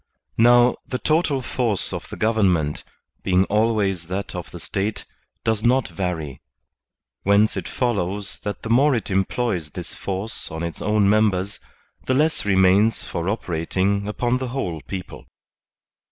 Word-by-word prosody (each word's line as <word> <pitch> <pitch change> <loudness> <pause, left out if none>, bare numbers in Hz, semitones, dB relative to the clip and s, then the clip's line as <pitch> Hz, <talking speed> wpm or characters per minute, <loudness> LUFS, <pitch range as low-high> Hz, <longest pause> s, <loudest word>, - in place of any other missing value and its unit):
Now, 120 +1 +6
the 125 - -2
total 150 +1 +1
force 115 -6 -1
of - - -6
the - - -6
government, 95 -9 +1 0.4
being 95 0 +3
always 105 -5 +1
that 95 +3 -4
of 90 -2 -6
the 85 - -9
State, 100 +5 -3 0.4
does 110 -1 0
not 125 +1 +3
vary; 80 -8 -4 0.8
whence 100 +2 +3
it - - -4
follows 105 -5 -2
that 105 - -5
the 115 - -5
more 135 +3 +5
it 115 - -3
employs 95 -3 0
this - - -6
force 100 +3 -4
on 80 +1 -5
its 85 -1 -5
own 105 -1 +2
members, 100 -2 +2 0.5
the 130 - +2
less 155 -1 +1
remains 95 +3 +4
for 85 +2 -3
operating 95 +1 -1
upon 120 +4 0
the 130 - -3
whole 95 - -3
people. 95 -2 -7
100 Hz, 145 wpm, -22 LUFS, 95-115 Hz, 0.8 s, Now